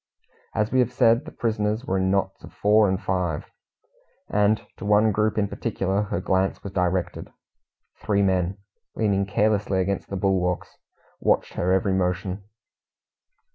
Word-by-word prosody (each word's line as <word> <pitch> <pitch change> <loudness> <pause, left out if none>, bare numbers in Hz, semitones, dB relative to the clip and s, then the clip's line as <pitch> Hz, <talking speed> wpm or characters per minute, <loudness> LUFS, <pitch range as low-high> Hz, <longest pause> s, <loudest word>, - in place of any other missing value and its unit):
As 110 0 0
we 130 - +3
have 125 -1 +2
said, 120 +2 +3
the 155 - -8
prisoners 110 +1 -1
were 95 -5 0
in 95 0 +1
knots 95 0 -1
of - - -11
four 105 0 +4
and 95 0 0
five, 90 -4 -2 0.9
and 105 +1 +2
to - - -9
one 105 +2 +4
group 105 +2 0
in 105 -1 +2
particular 100 -2 -1
her 105 -4 -2
glance 95 +1 0
was 100 - -6
directed. 90 -1 -1 0.7
Three 100 -1 +1
men, 95 0 +1 0.4
leaning 100 -3 +1
carelessly 100 -1 +1
against 100 +1 -2
the 100 - -3
bulwarks, 95 -2 0 0.4
watched - - +1
her 90 - 0
every 95 +1 +2
motion. 90 +1 -1
100 Hz, 150 wpm, -24 LUFS, 95-105 Hz, 0.9 s, four